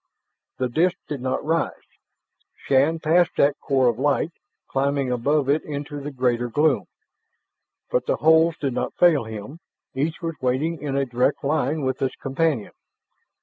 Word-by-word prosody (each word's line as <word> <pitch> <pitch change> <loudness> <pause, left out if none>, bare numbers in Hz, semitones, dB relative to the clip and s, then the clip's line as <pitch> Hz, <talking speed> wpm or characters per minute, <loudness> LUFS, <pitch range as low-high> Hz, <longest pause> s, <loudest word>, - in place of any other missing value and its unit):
The 130 - 0
disk 165 +9 +1
did 145 -4 -5
not 130 +2 -2
rise. 165 +2 -1 0.7
Shann 140 +5 +2
passed 165 +2 +2
that 140 +1 +3
core 135 -3 +2
of 120 0 +1
light, 145 +3 +1 0.4
climbing 140 -1 0
above 140 +4 +1
it 145 +3 +2
into 145 0 -5
the 145 - -5
greater 125 -3 0
gloom. 150 +4 +2 1.1
But - - 0
the - - +2
holes 160 +1 +4
did 135 -3 -1
not - - -3
fail 160 -8 +4
him; 110 +8 -8 0.3
each 150 +5 -2
was 165 -1 -3
waiting 140 +5 0
in 140 -2 -3
a 140 - +1
direct 125 +3 0
line 150 +1 0
with 130 0 -2
its 130 -1 -1
companion. 135 -4 -1
140 Hz, 155 wpm, -23 LUFS, 130-155 Hz, 1.1 s, holes